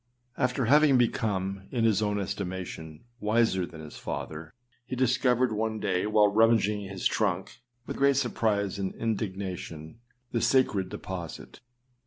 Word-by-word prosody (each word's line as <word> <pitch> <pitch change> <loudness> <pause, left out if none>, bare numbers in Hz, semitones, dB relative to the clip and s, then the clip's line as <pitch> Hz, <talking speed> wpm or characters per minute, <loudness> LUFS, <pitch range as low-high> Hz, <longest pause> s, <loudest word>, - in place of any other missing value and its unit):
After 125 0 0
having 145 +2 +5
become, 100 -5 0
in 120 -3 0
Iris 110 -2 +3
own 105 -1 0
estimation, 90 -5 -5 0.2
wiser 105 -4 +2
than 80 -1 -11
his 75 - -10
father, 80 +1 -6 0.3
he 130 - -5
discovered 125 -1 +2
one 110 0 -1
day, 90 0 0
while 105 -1 +5
rummaging 105 -1 +3
his 95 -1 -6
trunk, 95 -4 0 0.3
with - - -5
great 140 0 +4
surprise 105 -6 0
and 95 -1 -3
indignation, 95 -5 -4 0.3
the 115 - 0
sacred 105 -8 +2
deposit. 90 -5 -7
105 Hz, 135 wpm, -28 LUFS, 95-115 Hz, 0.3 s, having